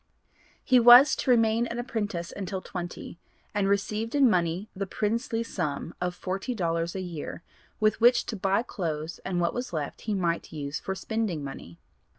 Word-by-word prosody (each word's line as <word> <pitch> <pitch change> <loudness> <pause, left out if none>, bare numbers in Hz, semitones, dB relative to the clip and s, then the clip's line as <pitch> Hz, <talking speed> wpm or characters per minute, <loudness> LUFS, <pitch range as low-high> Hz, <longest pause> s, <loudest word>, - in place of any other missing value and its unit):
He 255 -1 +5
was 245 +4 +9
to - - -2
remain 230 -1 +3
an 235 - -5
apprentice 210 -7 -3
until 190 -1 -4
twenty, 175 -2 -7 0.3
and 200 -1 +1
received 210 +4 -1
in 280 -2 +6
money 175 +2 0
the 195 +1 -3
princely 225 +3 -1
sum 165 -7 -3
of 180 0 -1
forty 195 +8 -3
dollars 170 -3 -1
a 190 - -2
year 170 -2 -6 0.4
'with 215 +1 +2
which 240 +1 +5
to 225 - -4
buy 195 +2 +1
clothes 160 -7 -4
and 180 -2 -2
what 170 -1 +1
was 245 -5 -4
left 150 -3 -4
he 215 -2 -2
might 170 -3 -1
use 145 -2 -4
for 190 - -4
spending 195 -6 -2
money.' 85 -11 -8
195 Hz, 170 wpm, -27 LUFS, 170-225 Hz, 0.4 s, was